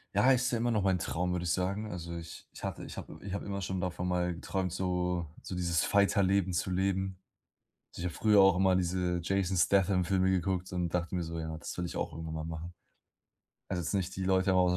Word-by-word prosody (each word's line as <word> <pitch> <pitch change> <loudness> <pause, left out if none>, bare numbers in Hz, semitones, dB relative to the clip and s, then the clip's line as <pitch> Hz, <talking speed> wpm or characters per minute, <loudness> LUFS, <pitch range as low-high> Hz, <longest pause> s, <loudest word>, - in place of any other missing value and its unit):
Ja, 130 - +6
ist 125 -1 +3
ja 115 - 0
immer 120 +1 +1
noch 105 -3 +2
mein 95 -2 +3
Traum, 90 +1 -1
würde 90 -1 -1
ich 85 - 0
sagen. 100 +4 -1
Also 85 -1 -5
ich 80 -1 -8
ich - - -11
hatte - - -4
ich - - -8
habe - - -8
ich 100 - -6
habe 100 - -3
immer 100 -1 -3
schon 95 -1 -2
davon 90 0 -2
mal 90 -1 +1
geträumt, 90 +1 -2
so 90 -1 -1
so 90 - -6
dieses 85 -2 +1
Fighter 100 0 +3
Leben 95 -1 +2
zu 95 - -1
leben. 95 0 0 0.8
Ich - - -6
habe 90 -1 -2
früher 105 -2 +5
auch 95 -2 +6
immer 95 0 +4
diese 90 -1 0
Jason 95 +1 0
Statham-Filme 95 0 +3
geguckt 95 0 0
so 90 - -6
und 90 -1 0
dachte 90 +1 -1
mir 90 - 0
so: 85 0 -5
„Ja, 80 0 -4
das - - -6
will 90 - -2
ich 85 - -5
auch - - -2
irgendwann 80 0 -6
mal 80 - -3
machen.“ 80 +2 -6 1.0
Also, 90 -2 -1
jetzt 85 - -2
nicht 95 -3 -1
die 95 - -2
Leute 95 0 +3
draußen 90 0 +5
auf 90 - +3
90 Hz, 240 wpm, -31 LUFS, 85-95 Hz, 1.0 s, Ja